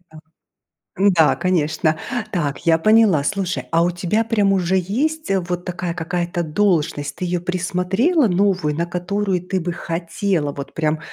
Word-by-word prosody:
так. 155 0 -13 0.8
Да, 180 -5 +4
конечно. 160 -3 0 0.3
Так, 150 -5 -2
я 165 -1 +5
поняла. 215 -5 +4
Слушай, 190 +3 -2
а 165 +1 +3
у 175 - +2
тебя 175 +5 0
прям 210 -3 +2
уже 185 -1 +1
есть, 275 - -1
э, 195 - +3
вот 175 0 -4
такая 175 -1 -3
какая-то 175 +1 -2
должность? 155 -4 0
Ты 185 - -4
её 175 0 -1
присмотрела 185 - +1
новую, 180 -5 +1
на 170 +2 -1
которую 180 +2 -2
ты 185 +1 -2
бы 175 0 -3
хотела 170 -1 -2
вот 140 0 -8
прям, 155 -1 0
180 Hz, 155 wpm, -20 LUFS, 165-195 Hz, 0.8 s, я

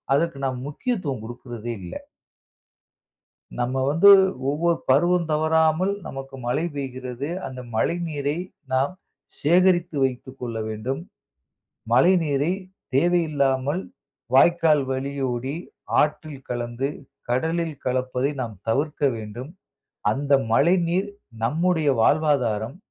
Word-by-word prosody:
அதற்கு 165 -1 0
நாம் 130 -1 -2
முக்கியத்துவம் 150 - -3
கொடுக்குறதே 120 -1 -6
இல்ல. 85 - -8 1.7
நம்ம 120 +2 -1 0.2
வந்து 170 +7 +6 0.4
ஒவ்வொரு 165 +4 +1
பருவம் 175 +5 +3
தவறாமல் 160 +4 +2
நமக்கு 135 0 -7
மழை 145 +7 0
பெய்கிறது. 130 0 -5 0.2
அந்த 130 -1 -8 0.2
மழை 165 +9 +1
நீரை 145 0 -2 0.4
நாம் 135 +7 +2 0.5
சேகரித்து 175 0 +3
வைத்துக்கொள்ள 125 -2 -5
வேண்டும். 120 +8 -3 0.9
மழை 135 +10 +6
நீரை 145 +3 +1 0.4
தேவையில்லாமல் 145 -1 +2 0.5
வாய்க்கால் 160 -1 +5
வழியோடி 130 -1 -2 0.5
ஆற்றில் 150 -2 -2
கலந்து, 120 +2 -2 0.4
கடலில் 160 +5 0
கலப்பதை 130 +1 0
நாம் 115 -4 -6
தவிர்க்க 145 +6 0
வேண்டும். 110 +6 -7 0.6
அந்த 140 +5 -3 0.2
மழை 170 +10 +5
நீர் 185 +4 0 0.3
நம்முடைய 160 +4 +2
வாழ்வாதாரம், 130 -4 +2
140 Hz, 95 wpm, -24 LUFS, 125-160 Hz, 1.7 s, வந்து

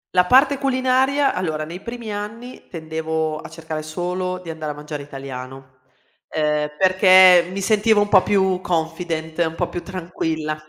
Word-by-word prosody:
La 180 - +5
parte 270 +4 +4
culinaria, 265 +1 +1
allora, 155 -4 -2
nei 170 +3 -8
primi 235 -3 -6
anni 225 +5 -8
tendevo 160 -1 -3
a - - -10
cercare 160 -1 -6
solo 180 +3 -3
di 165 - -6
andare 155 -2 -5
a - - -8
mangiare 150 0 -7
italiano, 135 -1 -9 0.5
ehm, 150 -1 0
perché 185 -1 +6
mi 195 - -4
sentivo 215 +1 +3
un 205 - 0
po' 190 -3 +6
più 190 -2 +1
confident, 165 -1 -3
un 165 -1 0
po' 175 +1 -2
più 175 - -5
tranquilla. 160 -4 -4
175 Hz, 155 wpm, -21 LUFS, 155-205 Hz, 0.5 s, perché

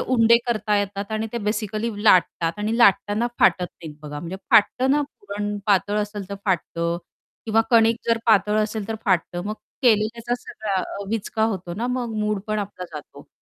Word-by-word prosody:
उंडे 235 -2 +4
करता 215 -3 +1
येतात 200 +1 -3
आणि 220 +1 -1
ते 235 - -2
बेसिकली 215 +1 -2
लाटतात 170 -4 +4
आणि 215 +2 -1
लाटताना 210 0 +4
फाटत 180 -1 +4
नाहीत 155 -3 -11
बघा. 150 -1 -6
म्हणजे 175 +3 -6
फाटतं 255 +5 +4
ना 290 +2 +3
पुरण 205 -6 -5
पातळ 205 +1 +2
असेल 205 -2 -4
तर 200 - -4
फाटतं 170 -2 -1 0.5
किंवा 220 0 +3
कणिक 230 -1 +5
जर 230 0 +3
पातळ 210 -1 +4
असेल 215 -1 -3
तर 225 - -2
फाटतं. 175 -3 +1
मग 210 +1 -3 0.3
केलेल्याचा 230 0 +2
सगळा 200 -4 -3 0.3
विचका 220 0 -2
होतो 185 -6 -3
ना 230 +6 -2
मग 250 -2 -2
मूडपण 210 0 -1
आपला 200 -3 -5
जातो. 150 -2 -10
210 Hz, 165 wpm, -23 LUFS, 195-225 Hz, 0.5 s, कणिक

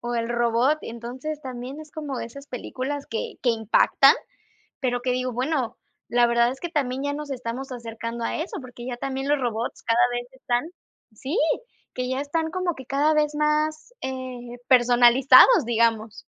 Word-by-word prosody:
O 240 0 -3
el 230 0 -1
robot. 240 +5 +2
Entonces, 255 +6 -6
también 260 +3 -7
es 305 -1 -12
como 290 -4 -5
de - - -4
esas 280 +4 -12
películas 270 +2 -5
que 225 - -4
que 245 - +3
impactan, 220 -1 +4 0.7
pero 245 -3 -1
que 250 0 0
digo, 255 0 -1
bueno, 255 0 -1 0.3
la 240 0 +4
verdad 235 0 +3
es 265 - -8
que 345 - -4
también 270 -4 -1
ya 285 - -1
nos 295 0 -6
estamos 255 +1 -5
acercando 230 -1 -6
a - - -2
eso, 320 +1 -4
porque 245 -1 -10
ya 245 -1 -4
también 270 +1 -3
los 295 - +3
robots 235 -2 -3
cada 230 0 +2
vez 245 0 -3
están 245 -2 -1 0.5
sí, 270 - -4 0.6
que 255 0 -3
ya 260 +1 -1
están 320 +3 -1
como 365 -1 -1
que 260 - -10
cada 290 +3 +2
vez 300 -1 +2
más, 305 +6 0
eh, 255 -2 -6
personalizados, 250 - +7
digamos. 225 -2 0
255 Hz, 175 wpm, -24 LUFS, 240-285 Hz, 0.7 s, personalizados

